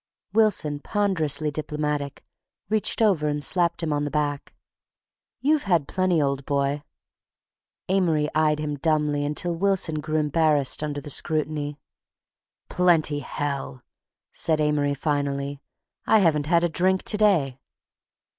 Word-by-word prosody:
Wilson, 205 -9 +2
ponderously 160 -6 0
diplomatic, 150 -1 -4 0.4
reached 220 +1 +1
over 180 -8 +2
and 145 0 -1
slapped 170 -1 +1
him 155 -2 0
on 145 0 -1
the 145 - -2
back. 145 -1 -3 0.9
"You've 295 -1 +2
had 165 -6 +2
plenty, 185 -3 +1
old 140 -1 -1
boy." 140 +1 -1 1.1
Amory 170 -6 +1
eyed 155 -1 +2
him 150 -1 -3
dumbly 150 -1 0
until 150 +4 -2
Wilson 180 -4 +1
grew 155 +1 -4
embarrassed 150 -3 +2
under 145 -1 -3
the 145 +1 -6
scrutiny. 150 -1 -2 0.9
"Plenty, 165 -5 +2
hell!" 140 -4 -4 0.5
said 160 -2 0
Amory 150 -1 +1
finally. 140 -1 -2 0.5
"I 220 - +5
haven't 155 -7 +2
had 170 +1 +3
a - - +3
drink 185 +3 +1
to 210 - +3
day." 165 -12 +2
150 Hz, 125 wpm, -24 LUFS, 145-175 Hz, 1.1 s, I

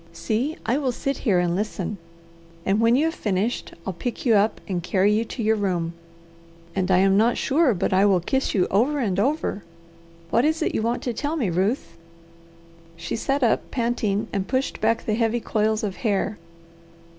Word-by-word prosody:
See, 220 - -2
I 245 +5 +1
will 265 -4 0
sit 275 +3 -3
here 205 -8 +2
and 175 -1 +1
listen, 205 -1 -3 0.7
and 195 +2 +2
when 230 +1 +4
you 290 +5 +3
have 325 - 0
finished 210 - -2
I'll 190 - -3
pick 240 +10 -5
you 235 - +4
up 210 +1 +2
and 180 -4 -2
carry 190 +3 +2
you 220 +2 +2
to 230 - -5
your 220 +1 +3
room, 180 -5 -1 0.8
and 190 -1 0
I 185 - +5
am 195 +1 +4
not 230 +3 +3
sure 280 -4 +2
but 180 - -1
I 190 +2 +4
will 190 -3 +4
kiss 265 +10 -1
you 185 - +3
over 250 +10 +2
and 200 -8 0
over. 270 -4 0 0.7
What 235 - +3
is 315 +2 +1
it - - -1
you - - 0
want 235 +2 -1
to 245 - -2
tell 290 +7 -2
me, 235 - 0
Ruth?" 180 -1 -1 1.0
She 170 - -4
sat 275 +4 -1
up 230 - +1
panting 230 -4 -1
and 195 -1 -1
pushed 260 +1 -1
back 225 +1 +1
the 215 - 0
heavy 230 +1 +1
coils 220 -1 0
of 200 -3 -3
hair. 205 -2 -1
215 Hz, 195 wpm, -24 LUFS, 195-245 Hz, 1.0 s, I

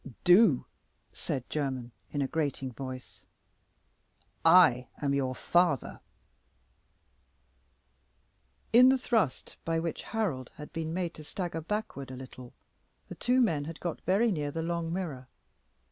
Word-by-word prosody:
"Do," 180 - +6 0.5
said 130 -2 -4
Jermyn, 130 -5 -3 0.2
in 145 -1 -1
a - - -1
grating 140 -4 -2
voice; 130 0 -8 1.2
"I 165 -8 +6
am 140 -1 0
your 130 -2 0
father." 175 -5 +1 2.7
In 250 +2 +8
the 265 - +4
thrust 225 - -1
by 165 0 0
which 165 0 -3
Harold 175 - -2
had 150 +1 -10
been 160 -2 -3
made 175 -1 -2
to 155 - -10
stagger 170 0 -4
backward 165 - -4
a 130 - -7
little, 130 -1 -11 0.6
the - - -6
two 250 +1 +2
men 155 -12 +1
had 165 +1 -7
got 170 -2 -4
very 210 +5 +2
near 150 -5 -2
the 160 +3 -3
long 170 -1 -2
mirror. 160 -8 -4
160 Hz, 130 wpm, -30 LUFS, 135-180 Hz, 2.7 s, In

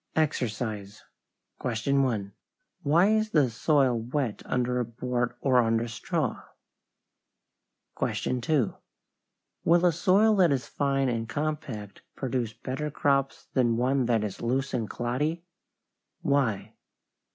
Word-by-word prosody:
=EXERCISE= 110 -8 -2 0.6
1. 115 -3 0 0.5
Why 165 +7 +4
is 215 0 +2
the 145 - +3
soil 130 0 +2
wet 120 0 -2
under 125 0 0
a - - +1
board 120 +1 -2
or 130 -3 +4
under 115 0 +1
straw? 115 -1 -2 1.6
2. 125 -1 0 0.9
Will 175 +1 +4
a 175 - +6
soil 195 +7 +4
that 180 -5 +5
is 135 -2 0
fine 135 -1 0
and 115 -2 -2
compact 135 -8 -4
produce 125 -4 -2
better 135 +6 -4
crops 140 -1 0
than 120 -3 +2
one 130 +1 +1
that 115 -3 +2
is 105 -3 -5
loose 130 +4 -1
and 115 -4 -1
cloddy? 145 +8 -2 0.8
Why? 135 -8 +1
130 Hz, 115 wpm, -27 LUFS, 115-145 Hz, 1.6 s, a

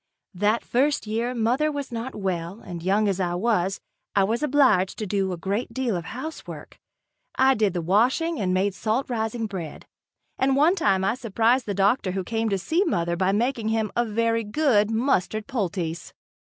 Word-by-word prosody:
That 210 +5 +1
first 280 +3 +1
year 230 +4 -2
mother 250 +7 +1
was 285 -3 -5
not 235 +2 -5
well 185 -1 -3
and 175 -2 -7
young 200 +4 +2
as 195 -1 0
I 175 -2 0
was, 195 -2 0 0.4
I 200 - +4
was 225 +5 0
obliged 265 -11 +3
to 215 - -3
do 195 -1 -1
a 180 - -4
great 200 +7 -3
deal 255 -5 0
of 170 -2 -4
housework. 310 - -8 0.6
I 265 +1 +5
did 210 -6 +1
the 175 -2 -2
washing 250 - +2
and 185 -2 0
made 190 +2 +1
salt 225 +7 -1
rising 225 0 -2
bread. 180 -7 -7 0.5
And 265 0 +2
one 305 +6 +4
time 195 - +1
I 195 - +2
surprised 235 +1 +1
the 200 - -2
doctor 200 0 +2
who 190 -1 -2
came 225 +3 -1
to 195 - +1
see 320 - +1
mother 170 - 0
by 185 +2 +1
making 230 +2 0
him 220 -2 0
a 240 - +2
very 230 +1 0
good 215 -2 +2
mustard 220 -3 0
poultice. 175 -7 -3
215 Hz, 185 wpm, -24 LUFS, 190-245 Hz, 0.6 s, I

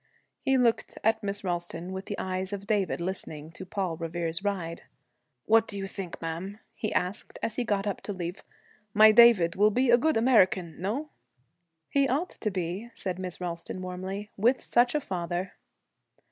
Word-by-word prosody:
He 270 0 +2
looked 240 -3 +1
at 220 0 +3
Miss 205 0 -1
Ralston 175 -1 -3
with 190 +1 -6
the 205 - -4
eyes 185 +1 -2
of 200 0 -5
David 205 -4 0
listening 165 -4 -5
to 185 +3 -9
'Paul 185 -4 -2
Revere's 165 +1 -3
Ride.' 175 -5 -2 0.6
'What 225 0 +4
do 200 - -4
you 195 - -3
think, 195 -3 -6
ma'am,' 170 +5 -5 0.2
he 215 - -3
asked, 180 +4 -2
as 225 - -1
he 250 - +1
got 205 -3 0
up 205 - -2
to - - +1
leave, 180 -1 -5 0.5
'my 215 +1 +9
David 215 -7 +7
will 210 +2 +5
be 245 +3 +2
a 240 - +7
good 315 0 +2
American, 190 -9 +3
no?' 250 +11 -2 0.8
'He 275 -1 +2
ought 295 +8 0
to 215 - -3
be,' 185 +4 -3
said 185 -2 -3
Miss 185 -2 -4
Ralston, 175 +1 -4
warmly, 190 +3 -5
'with 240 +6 +3
such 245 +3 +2
a - - +3
father.' 175 -2 -3
195 Hz, 175 wpm, -28 LUFS, 180-220 Hz, 0.8 s, my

